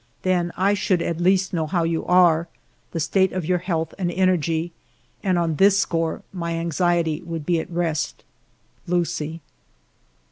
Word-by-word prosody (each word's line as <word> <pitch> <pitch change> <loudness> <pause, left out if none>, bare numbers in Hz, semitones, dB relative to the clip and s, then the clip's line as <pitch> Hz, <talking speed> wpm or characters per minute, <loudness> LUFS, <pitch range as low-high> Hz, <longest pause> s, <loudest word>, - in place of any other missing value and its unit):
Then 180 -2 +1
I 195 +3 +3
should 190 -3 +1
at 170 0 -2
least 190 +2 +2
know 160 -3 0
how 175 0 0
you 165 0 -1
are, 175 -2 +4 0.4
the 165 - -4
state 190 +4 +2
of 185 -3 -2
your 180 +1 +1
health 165 -3 -2
and 175 -2 0
energy, 170 -2 +1 0.5
and 185 -3 +1
on 165 -3 0
this 195 +2 +5
score 165 -4 -1
my 170 -2 -3
anxiety 170 -1 0
would 165 -3 -6
be 170 0 +2
at - - -6
rest. 170 -3 -2 0.6
Lucie." 165 -2 -1
175 Hz, 155 wpm, -23 LUFS, 165-185 Hz, 0.6 s, this